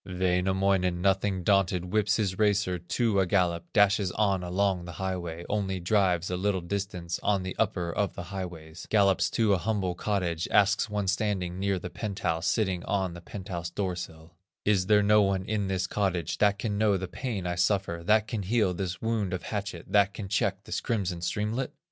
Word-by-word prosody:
Wainamoinen, 90 0 +1
nothing 95 0 +1
daunted, 95 -2 +2
Whips 105 0 +3
his 95 -4 -1
racer 100 -4 +2
to 100 +4 0
a 95 - +2
gallop, 85 -3 0
Dashes 100 -2 +3
on 100 -3 +1
along 90 0 0
the 85 - -8
highway; 85 -1 -4
Only 95 -3 -1
drives 90 -2 +1
a 90 - -1
little 95 0 0
distance, 90 -2 -3
On 100 -2 +1
the 95 - -5
upper 90 -5 0
of 100 -2 -1
the - - -5
highways, 85 -4 -7
Gallops 100 -3 +3
to 110 -3 +2
a 95 - +2
humble 100 -3 -1
cottage, 90 -3 -1
Asks 105 +2 +3
one 105 -2 -2
standing 95 -3 -1
near 100 0 +1
the 90 0 -6
penthouse, 95 -6 -2
Sitting 95 -5 0
on 95 -3 -1
the 85 - -9
penthouse 90 -2 -6
doorsill: 85 -4 -5 0.3
"Is 95 -3 +2
there 105 0 +5
no 105 +1 +5
one 95 -2 +1
in 105 -2 -1
this 95 -1 0
cottage, 95 -6 -1
That 100 -1 +3
can 105 -1 -2
know 105 -2 +3
the 95 0 -4
pain 105 -2 -4
I 90 - -1
suffer, 90 -1 0
That 105 +3 +3
can 115 -4 -3
heal 100 -1 +1
this 90 +1 -4
wound 110 -5 0
of 90 - -3
hatchet, 100 -5 -4
That 100 -1 +3
can 105 - -5
check 95 0 0
this - - -3
crimson 95 -7 -2
streamlet?" 105 +8 -2
95 Hz, 185 wpm, -28 LUFS, 90-105 Hz, 0.3 s, there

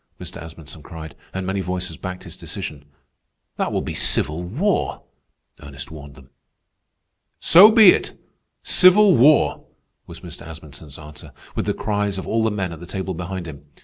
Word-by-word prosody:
Mr. - - -8
Asmunsen 80 -2 -11
cried, 80 -2 -10 0.2
and 95 0 -5
many 95 +1 -2
voices 90 0 -4
backed 95 0 -7
his 85 -4 -11
decision. 70 -1 -7 0.7
"That - - -1
will - - -1
be - - -5
civil 75 +4 0
war," 150 - -1 0.6
Ernest 70 -1 -10
warned 75 -3 -11
them. 65 -1 -18 1.1
"So 190 +6 +8
be 220 -3 +8
it, - - -2 0.4
civil 185 +1 +6
war," 145 +5 +4 0.4
was - - -10
Mr. - - -9
Asmunsen's 75 -2 -11
answer, 75 0 -12 0.2
with - - -3
the - - 0
cries 105 -2 -2
of 95 - -5
all 115 0 0
the 110 - +2
men 95 -5 -3
at 80 - -10
the 85 - -11
table 95 0 -4
behind 90 +1 -6
him. 75 -3 -10
90 Hz, 165 wpm, -21 LUFS, 75-105 Hz, 1.1 s, So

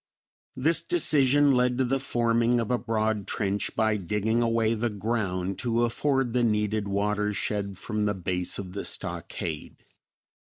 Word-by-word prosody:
This 155 +6 +3
decision 145 - +4
led 125 -1 +2
to 130 - +2
the 135 +2 0
forming 120 -1 +1
of 115 0 -2
a 125 - +1
broad 110 -2 -1
trench 100 -1 -2
by 110 -1 +2
digging 105 +5 0
away 115 -1 +2
the 115 +1 -1
ground 100 -3 -2
to 120 -1 0
afford 135 +1 0
the 125 -1 +2
needed 105 -2 0
watershed 105 -1 -1
from 105 +2 -2
the 105 -1 0
base 90 -1 -2
of 95 -2 -7
the 100 - -4
stockade. 80 -4 -5
110 Hz, 150 wpm, -27 LUFS, 100-120 Hz, -, decision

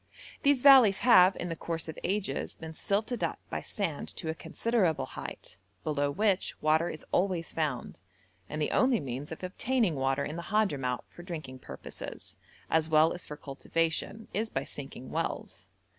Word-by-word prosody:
These 280 -3 +3
valleys 260 -8 +9
have, 190 -6 +8
in 175 - -4
the 165 - -2
course 165 0 -3
of 160 - -6
ages, 190 -8 -1
been 160 0 -8
silted 215 +8 -1
up - - -1
by - - -2
sand - - -3
to 160 - -4
a - - 0
considerable 195 -2 0
height, 90 - -8 0.2
below 145 -2 0
which 200 +4 +1
water 155 +2 +3
is 155 - -8
always 180 -3 0
found, 145 - -2 0.5
and 150 - -4
the 150 - 0
only 255 -2 +4
means 140 +1 -5
of 160 - -7
obtaining 220 +1 +1
water 135 0 0
in 150 +3 -5
the 170 - -7
Hadhramout 145 - +1
for - - -13
drinking 155 -8 -7
purposes, - - -8 0.3
as 160 0 +2
well 155 +1 +5
as 175 - -6
for 150 - -7
cultivation, 165 +9 -2
is 220 +2 -1
by 135 - -2
sinking 135 -3 -8
wells. - - -3
165 Hz, 170 wpm, -30 LUFS, 150-200 Hz, 0.5 s, valleys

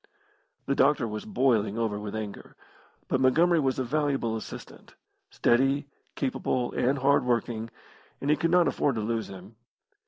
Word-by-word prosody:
The 140 - +1
doctor 135 -3 +3
was 105 0 -5
boiling 110 -3 +1
over 110 -3 -1
with 105 0 -6
anger, 105 -2 -7 0.5
but - - 0
Montgomery 165 +6 +4
was 135 -3 0
a 130 - 0
valuable 135 -4 0
assistant 110 - -9 0.3
steady, 135 +4 +2 0.3
capable, 130 -2 -1
and 135 +3 +1
hardworking 120 -4 +1 0.5
and 140 - 0
he - - +5
could 165 - 0
not 175 0 +4
afford 140 -4 0
to 110 - -2
lose 115 +1 -2
him. 95 +3 -12
125 Hz, 150 wpm, -27 LUFS, 110-140 Hz, 0.5 s, he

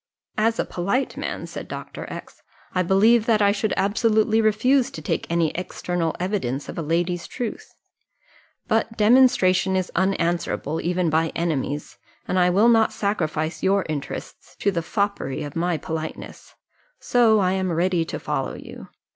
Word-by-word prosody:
"As 225 +1 +2
a - - 0
polite 200 +10 -1
man," - - -4
said - - -7
Dr. - - -7
X, - - -9 0.3
"I 185 - +2
believe 210 +5 +4
that 220 -2 +4
I 200 -1 +4
should 205 0 -1
absolutely 220 +2 +2
refuse 235 +5 +3
to - - -8
take 155 - -2
any 170 -2 +1
external 175 -2 -3
evidence 175 - -2
of - - -6
a - - -1
lady's 170 +2 -1
truth; 245 -4 -6 0.9
but 225 0 0
demonstration 210 -5 +4
is 185 -1 -1
unanswerable 170 -4 0
even 175 -1 0
by 160 +1 +1
enemies, 150 -3 -2 0.3
and 185 - +1
I 180 0 +4
will 200 +6 +4
not 225 -2 +4
sacrifice 160 -5 -2
your 195 0 +2
interests 150 -2 -6
to 200 - 0
the 170 -3 -1
foppery 200 -5 -2
of 145 -1 -7
my 170 0 0
politeness 160 0 -7 0.4
so 235 -3 +4
I 185 -3 +2
am 190 -1 -1
ready 175 +1 +1
to - - -5
follow - - -3
you. - - -10
185 Hz, 155 wpm, -23 LUFS, 165-215 Hz, 0.9 s, believe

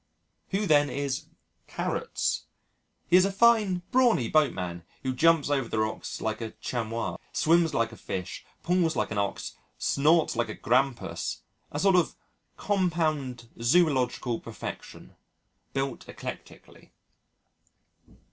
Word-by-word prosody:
Who, 200 +2 0
then, 145 -4 +4
is 140 -2 -2 0.4
"Carrots"? - - -2 0.6
He 175 - +6
is 185 - +6
a 195 - +1
fine 205 -4 +4
brawny 245 - +3
boat 155 -2 +4
man 85 -2 -5 0.2
who 130 -1 -1
jumps 165 +3 +4
over 135 -5 0
the - - -2
rocks 110 0 -2
like 110 +1 -2
a 110 -1 -5
Chamois, 115 -1 -3 0.2
swims 165 -1 +3
like 115 0 +1
a - - -10
Fish, 90 -2 -5 0.2
pulls 175 -2 +2
like - - -1
an 105 - -1
Ox, 100 - -3 0.2
snorts 155 +2 +3
like 120 -1 0
a - - -5
Grampus 130 +1 0 0.3
a - - -4
sort 195 +2 +4
of 175 - +1 0.4
compound 155 - 0
zoological 125 -4 +2
perfection, - - -8 0.6
built 135 0 -3
eclectically. - - -9
145 Hz, 130 wpm, -28 LUFS, 120-175 Hz, 0.6 s, He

